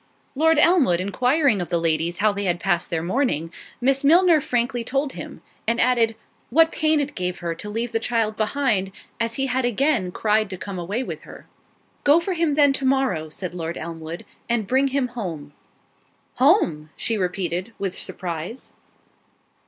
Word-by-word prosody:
Lord 320 Hz, +3 st, +3 dB
Elmwood 300 Hz, -, +4 dB
inquiring 250 Hz, -, +2 dB
of 175 Hz, -, -5 dB
the 170 Hz, -1 st, +1 dB
ladies 165 Hz, +1 st, 0 dB
how 215 Hz, +1 st, +3 dB
they 200 Hz, 0 st, -3 dB
had 175 Hz, -2 st, 0 dB
passed 175 Hz, +1 st, 0 dB
their 165 Hz, -2 st, -2 dB
morning, 175 Hz, -, -1 dB, 0.3 s
Miss 270 Hz, +2 st, +2 dB
Milner 335 Hz, +1 st, +5 dB
frankly 245 Hz, -1 st, -1 dB
told 275 Hz, +3 st, -1 dB
him; -, -, -9 dB, 0.2 s
and 230 Hz, +1 st, +1 dB
added, 235 Hz, -3 st, +3 dB, 0.3 s
"What 325 Hz, +5 st, +4 dB
pain 310 Hz, -1 st, +2 dB
it 290 Hz, 0 st, -2 dB
gave 180 Hz, -4 st, -3 dB
her 170 Hz, -1 st, -3 dB
to 185 Hz, +5 st, -8 dB
leave 230 Hz, +3 st, -2 dB
the 225 Hz, -, 0 dB
child 225 Hz, -2 st, 0 dB
behind, 215 Hz, -4 st, 0 dB, 0.3 s
as 230 Hz, 0 st, -1 dB
he 270 Hz, -, 0 dB
had 260 Hz, 0 st, 0 dB
again 245 Hz, -5 st, +1 dB
cried 215 Hz, +1 st, +1 dB
to 190 Hz, -, -6 dB
come 190 Hz, 0 st, -6 dB
away 200 Hz, +9 st, -2 dB
with -, -, -6 dB
her." -, -, -13 dB, 0.6 s
"Go 290 Hz, +3 st, +6 dB
for 370 Hz, +3 st, -2 dB
him 330 Hz, -4 st, +1 dB
then 285 Hz, -2 st, +5 dB
to 275 Hz, -, -3 dB
morrow," 260 Hz, -13 st, +1 dB
said 180 Hz, +3 st, -6 dB
Lord 170 Hz, -1 st, -4 dB
Elmwood, 165 Hz, +1 st, -7 dB, 0.2 s
"and 235 Hz, -3 st, +1 dB
bring 265 Hz, +6 st, +2 dB
him 270 Hz, -2 st, 0 dB
home." 165 Hz, -12 st, -6 dB, 0.8 s
"Home!" 250 Hz, -, +3 dB
she 230 Hz, -, -1 dB
repeated, 180 Hz, +1 st, -2 dB
with 195 Hz, -2 st, -3 dB
surprise. 175 Hz, +6 st, -6 dB
225 Hz, 175 wpm, -23 LUFS, 180-270 Hz, 0.8 s, Go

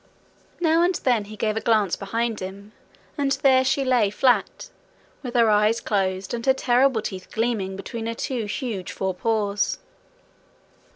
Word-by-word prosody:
Now 330 Hz, -1 st, +3 dB
and 355 Hz, +1 st, +2 dB
then 240 Hz, -5 st, +1 dB
he 215 Hz, +1 st, -10 dB
gave 215 Hz, 0 st, -1 dB
a 220 Hz, -, -2 dB
glance 215 Hz, -5 st, +2 dB
behind 225 Hz, +3 st, -2 dB
him, 195 Hz, +2 st, -8 dB, 0.5 s
and 275 Hz, -1 st, +2 dB
there 260 Hz, -1 st, +5 dB
she 270 Hz, +1 st, +1 dB
lay 245 Hz, -5 st, +3 dB
flat, 245 Hz, -, +1 dB, 0.5 s
with 250 Hz, -2 st, -7 dB
her 235 Hz, -2 st, +5 dB
eyes 210 Hz, +2 st, +3 dB
closed 190 Hz, -2 st, -1 dB
and 235 Hz, -1 st, -3 dB
her 265 Hz, -, +5 dB
terrible 250 Hz, -2 st, +2 dB
teeth 190 Hz, -3 st, -6 dB
gleaming 220 Hz, -4 st, -1 dB
between 225 Hz, +4 st, -6 dB
her 230 Hz, -, -3 dB
two 240 Hz, -2 st, -3 dB
huge 205 Hz, -1 st, -4 dB
forepaws. 200 Hz, +2 st, -1 dB
225 Hz, 155 wpm, -23 LUFS, 200-250 Hz, 0.5 s, there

